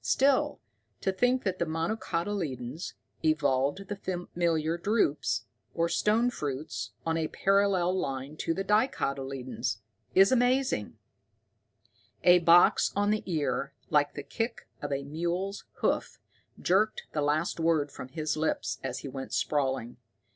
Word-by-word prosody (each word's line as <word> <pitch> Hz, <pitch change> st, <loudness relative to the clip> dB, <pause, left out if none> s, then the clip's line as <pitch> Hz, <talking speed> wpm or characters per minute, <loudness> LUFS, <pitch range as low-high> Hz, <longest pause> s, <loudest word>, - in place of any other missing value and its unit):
Still, 275 Hz, 0 st, +2 dB, 0.4 s
to 190 Hz, -, +1 dB
think 245 Hz, +6 st, +2 dB
that 185 Hz, -3 st, -1 dB
the 170 Hz, -, +1 dB
monocotyledons 165 Hz, -, -3 dB, 0.3 s
evolved 150 Hz, +3 st, +1 dB
the 205 Hz, -, -3 dB
familiar 170 Hz, -4 st, -1 dB
drupes, 150 Hz, -, +1 dB, 0.3 s
or 170 Hz, 0 st, +2 dB
stone 225 Hz, +6 st, +2 dB
fruits, 145 Hz, -, -4 dB, 0.2 s
on 165 Hz, 0 st, +1 dB
a 160 Hz, -1 st, 0 dB
parallel 195 Hz, -2 st, +2 dB
line 135 Hz, 0 st, -4 dB
to 165 Hz, -, -1 dB
the 195 Hz, -, -1 dB
dicotyledons 135 Hz, -, -1 dB, 0.4 s
is 195 Hz, +4 st, +7 dB
amazing!" 250 Hz, -, +1 dB, 1.3 s
A 180 Hz, 0 st, +7 dB
box 170 Hz, +1 st, +6 dB
on 205 Hz, +1 st, +2 dB
the 215 Hz, -, +1 dB
ear 150 Hz, -3 st, -1 dB, 0.2 s
like 145 Hz, -1 st, +3 dB
the 145 Hz, -, -5 dB
kick 230 Hz, -, -4 dB
of 145 Hz, -, -4 dB
a 140 Hz, 0 st, -1 dB
mule's 175 Hz, +7 st, -3 dB, 0.2 s
hoof -, -, 0 dB, 0.4 s
jerked 210 Hz, +4 st, +2 dB
the 150 Hz, -, -1 dB
last 150 Hz, +4 st, 0 dB
word 160 Hz, -3 st, +2 dB
from 130 Hz, -, -8 dB
his 155 Hz, +3 st, -2 dB
lips 155 Hz, +1 st, -1 dB
as 130 Hz, -2 st, -3 dB
he -, -, -6 dB
went 135 Hz, 0 st, -6 dB
sprawling. 130 Hz, -5 st, 0 dB
165 Hz, 135 wpm, -29 LUFS, 140-195 Hz, 1.3 s, is